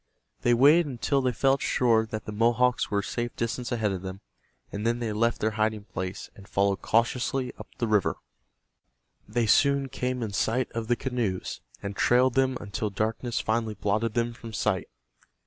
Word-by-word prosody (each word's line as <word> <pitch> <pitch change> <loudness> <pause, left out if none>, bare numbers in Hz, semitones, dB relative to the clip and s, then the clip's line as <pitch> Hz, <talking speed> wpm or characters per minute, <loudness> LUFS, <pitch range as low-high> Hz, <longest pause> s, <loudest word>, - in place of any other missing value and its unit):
They 120 0 +4
waited 150 +7 +6
until 135 +2 0
they 130 -1 +1
felt 135 +3 +2
sure 115 -3 +2
that 110 0 -5
the - - -5
Mohawks 120 +3 +2
were 100 -1 +1
a - - -12
safe 120 +2 -3
distance 120 +2 -3
ahead 110 -4 0
of 95 -2 -3
them, 95 +1 -7 0.5
and 105 - -4
then 115 +1 +1
they 115 -3 -2
left 115 +2 +1
their 110 - +1
hiding 110 -1 +1
place, 95 -2 -6
and 100 -1 -14
followed 100 0 +1
cautiously 125 +3 +1
up - - -8
the 120 - 0
river. 105 -3 +2 1.1
They 115 +3 0
soon 140 +4 +3
came 125 -1 -2
in 105 -3 -4
sight 115 +5 0
of 115 -1 -4
the 120 - +3
canoes, 120 -8 -3 0.2
and 100 0 -4
trailed 125 +4 +4
them 130 0 +2
until 105 +1 -3
darkness 110 +4 -2
finally 110 -1 -1
blotted 105 +2 -1
them 120 0 0
from 115 -1 -10
sight. 105 -4 0
115 Hz, 180 wpm, -27 LUFS, 105-125 Hz, 1.1 s, waited